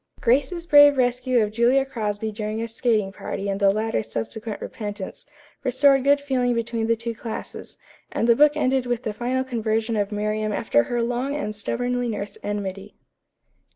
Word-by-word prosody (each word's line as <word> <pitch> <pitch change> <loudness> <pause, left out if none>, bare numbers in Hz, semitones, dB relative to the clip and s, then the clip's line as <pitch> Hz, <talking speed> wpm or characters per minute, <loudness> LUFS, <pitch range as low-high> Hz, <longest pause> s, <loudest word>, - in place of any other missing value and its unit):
Grace's 280 +8 +1
brave 290 -3 +7
rescue 250 -1 +2
of 210 - -2
Julia 240 +4 +3
Crosby 220 -4 -3
during 215 0 -4
a 230 - -2
skating 225 -3 0
party 195 +1 -5
and 195 0 -2
the 200 -1 +4
latter's 200 - -1
subsequent 215 - -4
repentance 205 -3 -7 0.4
restored 270 +1 +4
good 285 +1 +4
feeling 255 -4 0
between 230 -1 -1
the 230 - +3
two 230 +1 -4
classes, 225 0 -7 0.3
and 230 - 0
the 235 - +6
book 295 +3 +5
ended 260 -3 +1
with 245 0 -1
the 220 -4 -3
final 250 +4 -1
conversion 225 -2 -1
of 205 0 -1
Miriam 215 +1 -1
after 205 - +2
her 240 -1 -1
long 245 +4 -2
and 215 -8 -3
stubbornly 245 +3 -2
nursed 205 -2 -5
enmity. 200 -2 -5
230 Hz, 170 wpm, -23 LUFS, 210-255 Hz, 0.4 s, brave